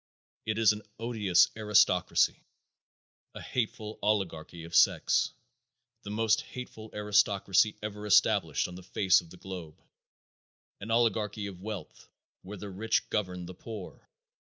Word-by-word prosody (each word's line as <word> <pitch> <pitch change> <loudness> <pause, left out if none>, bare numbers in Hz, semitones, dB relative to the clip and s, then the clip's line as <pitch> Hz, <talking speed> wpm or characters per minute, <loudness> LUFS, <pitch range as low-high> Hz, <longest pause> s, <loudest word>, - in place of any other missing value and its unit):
It 110 0 -1
is 110 -2 +5
an 105 - -7 0.2
odious 105 -7 +3
aristocracy; 105 -1 +3 0.9
a - - -7
hateful 110 -3 -3
oligarchy 85 -5 -1
of 85 +1 -11
sex; - - +4 0.7
the - - -9
most 110 +1 +2
hateful 110 -3 -9
aristocracy 105 0 +2
ever 105 0 -5
established 105 - +3
on 90 - -10
the 90 - -9
face 95 +1 +3
of 85 - -17
the 90 - -13
globe; 90 -5 -9 1.0
an 105 - -8
oligarchy 110 -2 +1
of 95 -3 -8
wealth, 100 -5 -8 0.3
where 105 +3 -9
the 100 +1 -7
rich 105 +4 -1
govern 90 -4 -2
the 90 - -8
poor. 105 0 -10
105 Hz, 130 wpm, -29 LUFS, 95-110 Hz, 1.0 s, is